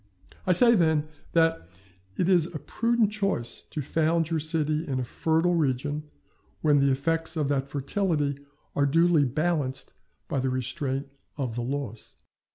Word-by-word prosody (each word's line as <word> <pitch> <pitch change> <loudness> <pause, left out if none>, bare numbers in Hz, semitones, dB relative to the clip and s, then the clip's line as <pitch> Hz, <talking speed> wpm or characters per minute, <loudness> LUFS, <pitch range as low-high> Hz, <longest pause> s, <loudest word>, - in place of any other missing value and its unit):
I - - +4
say, 235 +6 +7
then, 160 -6 +2 0.3
that 165 - +2 0.5
it 175 - +1
is 175 -4 +4
a 170 - -6
prudent 230 - 0
choice 195 - -2
to 150 - -6
found 160 +3 +1
your 165 - +1
city 155 0 0
in 130 -2 -1
a - - -1
fertile 160 +7 +1
region 150 0 -1 0.5
when 150 -2 +4
the 140 0 +3
effects 165 +5 0
of 150 -3 0
that 135 -1 0
fertility 145 0 -1 0.4
are 140 0 +3
duly 165 0 +4
balanced 145 0 -1 0.3
by 140 - -1
the 130 0 0
restraint 130 +2 -2 0.3
of 130 -5 -2
the 120 - -3
laws. 120 -3 -5
150 Hz, 155 wpm, -27 LUFS, 135-165 Hz, 0.5 s, say